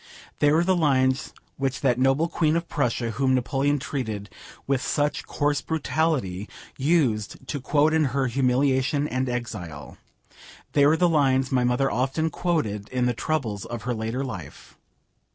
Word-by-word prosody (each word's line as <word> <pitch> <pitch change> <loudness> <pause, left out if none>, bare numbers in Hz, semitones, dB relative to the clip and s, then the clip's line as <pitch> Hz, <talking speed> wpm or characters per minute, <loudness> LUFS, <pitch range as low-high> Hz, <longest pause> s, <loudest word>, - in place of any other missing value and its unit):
They 145 - +4
were 160 +3 +4
the 185 +1 +2
lines 130 -5 +2 0.3
which 135 0 -2
that 125 -3 +2
noble 135 +5 +3
Queen 160 -2 +1
of 170 0 -1
Prussia, 120 -5 -1
whom 130 +3 +1
Napoleon 135 +3 +1
treated 110 -8 -4 0.3
with 135 -2 0
such 145 +1 -1
coarse 145 -1 0
brutality, 145 - -1 0.3
used 135 - 0
to 130 +3 -4
quote 150 +4 +2
in 160 -1 +3
her 135 0 0
humiliation 130 +3 +1
and 130 -1 -1
exile; 100 -11 -6 0.7
they 145 -1 +4
were 155 +2 +4
the 180 - +4
lines 135 -5 +2
my 125 -2 +2
mother 125 +3 +1
often 135 +6 0
quoted 110 - -1
in 125 -1 0
the 125 - +1
troubles 115 -8 -2
of 120 -2 -6
her 125 - -1
later 115 +4 -3
life. 95 -10 -9
135 Hz, 155 wpm, -25 LUFS, 125-145 Hz, 0.7 s, They